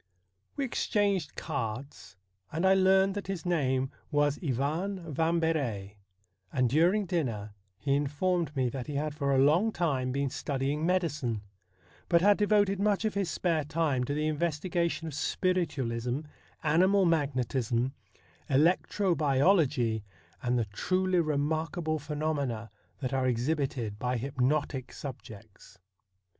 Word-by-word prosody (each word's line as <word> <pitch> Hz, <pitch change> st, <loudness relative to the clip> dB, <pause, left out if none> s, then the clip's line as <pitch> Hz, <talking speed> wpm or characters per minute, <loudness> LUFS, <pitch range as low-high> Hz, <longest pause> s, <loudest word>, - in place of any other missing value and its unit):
We 280 Hz, -, -1 dB
exchanged 200 Hz, -, 0 dB
cards, 115 Hz, -1 st, -5 dB, 0.3 s
and 165 Hz, +4 st, -1 dB
I 190 Hz, -, +6 dB
learned 190 Hz, 0 st, +4 dB
that 205 Hz, -1 st, -5 dB
his 190 Hz, -4 st, -4 dB
name 135 Hz, -6 st, +1 dB, 0.2 s
was 145 Hz, 0 st, +1 dB
Ivan 160 Hz, +6 st, -2 dB
Vambery, 145 Hz, -11 st, 0 dB, 0.5 s
and 125 Hz, -2 st, +2 dB
during 175 Hz, -, +3 dB
dinner 115 Hz, -, -2 dB, 0.2 s
he 140 Hz, -1 st, 0 dB
informed 150 Hz, +3 st, 0 dB
me 130 Hz, -2 st, +1 dB
that 130 Hz, -1 st, -5 dB
he 145 Hz, -, -4 dB
had 150 Hz, +1 st, -1 dB
for 140 Hz, -2 st, -1 dB
a 135 Hz, -, +3 dB
long 160 Hz, +11 st, +4 dB
time 140 Hz, -9 st, 0 dB
been 140 Hz, 0 st, -1 dB
studying 140 Hz, +3 st, -1 dB
medicine, 150 Hz, -, 0 dB, 0.7 s
but 170 Hz, -1 st, +5 dB
had 205 Hz, 0 st, +6 dB
devoted 205 Hz, -2 st, +3 dB
much 210 Hz, +1 st, +1 dB
of 215 Hz, -, 0 dB
his 200 Hz, -3 st, -1 dB
spare 160 Hz, 0 st, 0 dB
time 150 Hz, -4 st, 0 dB
to 145 Hz, -, -2 dB
the 150 Hz, +1 st, 0 dB
investigation 165 Hz, +2 st, -1 dB
of 160 Hz, -, -5 dB
spiritualism, 135 Hz, -8 st, -1 dB, 0.4 s
animal 185 Hz, +5 st, +4 dB
magnetism, 130 Hz, -5 st, 0 dB, 0.6 s
electro 175 Hz, +6 st, +2 dB
biology, 140 Hz, -, +2 dB, 0.4 s
and 125 Hz, 0 st, +1 dB
the 115 Hz, -, +1 dB
truly 185 Hz, -, 0 dB
remarkable 155 Hz, +1 st, -1 dB
pheno 150 Hz, +2 st, -2 dB
mena 115 Hz, -6 st, -3 dB, 0.3 s
that 130 Hz, -1 st, -2 dB
are 130 Hz, -1 st, +1 dB
exhibited 125 Hz, -4 st, -1 dB
by 125 Hz, +1 st, 0 dB
hypnotic 135 Hz, +1 st, -1 dB
subjects. 110 Hz, -7 st, -10 dB
150 Hz, 130 wpm, -29 LUFS, 130-175 Hz, 0.7 s, I